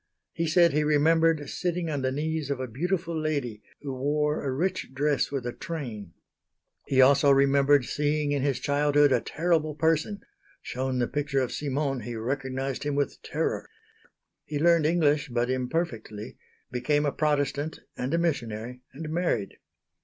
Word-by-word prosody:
He 165 - -1
said 170 0 +4
he 150 +1 +2
remembered 155 0 +3
sitting 175 -1 -2
on 145 -3 -2
the 130 0 0
knees 155 +1 -2
of 140 -2 -1
a 130 - -2
beautiful 170 - -2
lady 145 -9 -2 0.2
who 140 -2 -4
wore 150 +3 0
a 135 - -1
rich 170 -1 -2
dress 145 +1 +1
with 135 -3 -3
a 120 - -3
train. 115 - -6 0.7
He 130 - +1
also 140 +2 +6
remembered 140 0 +4
seeing 150 +1 0
in 145 -1 0
his 140 -1 +1
childhood 145 0 +3
a - - +3
terrible 160 -2 0
person; 160 +6 +1 0.4
shewn 130 0 -3
the 120 -1 +1
picture 140 -2 -1
of 125 - -2
Simon 140 -1 -1
he 120 +1 -6
recognised 130 +2 -3
him 145 -1 -2
with 145 -1 -1
terror. - - -2 0.8
He 150 - -3
learned 165 0 +4
English 155 -4 +2
but 120 +1 0
imperfectly, 125 -6 -3 0.4
became 145 +4 +1
a 145 - +1
Protestant 145 0 -1
and 125 +2 -3
a - - +2
missionary 125 -7 -2
and 155 +4 -7
married. 155 - -1
145 Hz, 160 wpm, -27 LUFS, 130-155 Hz, 0.8 s, also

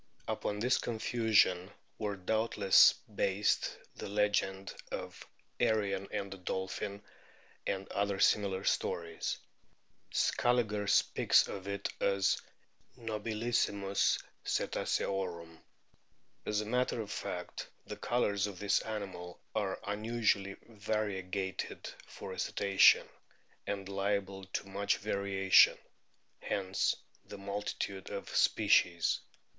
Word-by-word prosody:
Upon 105 - -2
this 125 +4 +2
confusion 110 -5 +2 0.3
were 105 -2 -2
doubtless 100 0 +5 0.2
based 100 +1 +1 0.2
the - - -6
legend 100 -2 0 0.2
of - - -6 0.4
Arion 100 -3 +1
and 100 -1 -4
the 95 - -11
Dolphin 95 +2 -4 0.6
and 95 -1 -2
other 100 -1 -1
similar 95 -1 +3
stories. 85 -4 -1 0.7
Scaliger 110 -4 +1
speaks - - +4
of 100 -1 -7
it 100 0 -2
as 100 -1 +2 0.3
" - - -35
nobilissimus 110 -3 0 0.3
Cetaceorum." 85 -4 -2 0.9
As 105 0 +1
a - - -5
matter 125 +2 0
of 105 -2 -4
fact 90 -3 -5 0.2
the - - -6
colours 105 -5 0
of 100 -3 -8
this 100 +1 +2
animal 95 -5 -6
are 100 -3 -1
unusually 105 -2 0
variegated 100 -3 -3 0.2
for - - -8
a - - -7
Cetacean, 100 -1 +5 0.6
and 100 -1 -3
liable 100 -1 -2
to 95 - -4
much 100 +1 0
variation 100 -2 +4 0.6
(hence 95 -1 0 0.3
the 100 - -9
multitude 100 -1 -4
of - - -6
"species"). 85 -2 +3
100 Hz, 105 wpm, -33 LUFS, 95-105 Hz, 0.9 s, doubtless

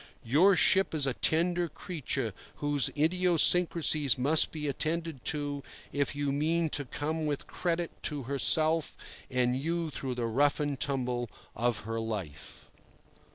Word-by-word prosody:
Your 170 - +5
ship 190 -1 +3
is 145 -3 +4
a 135 - 0
tender 170 +4 0
creature, 145 - -4 0.2
whose 145 -2 +1
idiosyncrasies 165 -3 +3
must 145 +5 +5
be 150 -2 -4
attended 160 -1 -3
to 145 -2 -2 0.3
if 145 0 -1
you 145 -1 -1
mean 160 +4 +1
her 160 - 0
to 145 -1 -3
come 155 +4 -3
with 145 -2 -3
credit 170 -1 -2
to 145 -2 -3
herself 155 +4 +1 0.3
and 125 -1 +1
you 165 +4 -2
through 130 -2 -5
the 120 -1 -2
rough 140 +6 +2
and 145 -2 -2
tumble 125 -4 -1 0.3
of 120 -1 0
her 115 +1 -4
life. 100 -10 -6
145 Hz, 145 wpm, -30 LUFS, 130-165 Hz, 0.3 s, Your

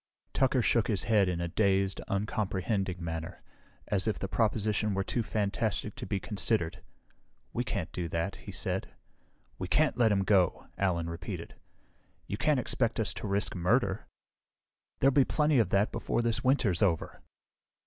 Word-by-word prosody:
Tucker 130 -2 +2
shook 115 -1 +2
his 100 -5 0
head 105 -5 +3
in 90 -2 -2
a 85 - -1
dazed, 95 +1 +1
uncomprehending 100 -2 -1
manner, 80 -1 -5 0.4
as 100 0 0
if 110 - 0
the 100 - -3
proposition 105 -1 0
were 95 - 0
too 120 - -1
fantastic 105 -1 -1
to - - -7
be 100 - -1
considered. 95 -4 -1 0.7
"We 120 - 0
can't 100 -7 -3
do 90 -2 -3
that," 85 +4 -2
he - - -9
said. - - -1 0.7
"We 95 - -3
can't 155 +8 +2
let 115 -3 +5
him 100 -1 +2
go!" 95 -3 +2
Allen 85 -4 0
repeated. 85 +1 -6 0.7
"You - - -3
can't 150 +3 +2
expect 120 -1 0
us 110 - 0
to - - -5
risk 100 0 0
murder!" 95 +2 +1 0.9
"There'll 135 - +6
be 140 0 +5
plenty 150 0 +2
of 110 -6 +2
that 100 +3 +2
before 120 - -1
this 115 +2 0
winter's 125 - +3
over!" 85 -6 0
100 Hz, 160 wpm, -30 LUFS, 95-115 Hz, 0.9 s, There'll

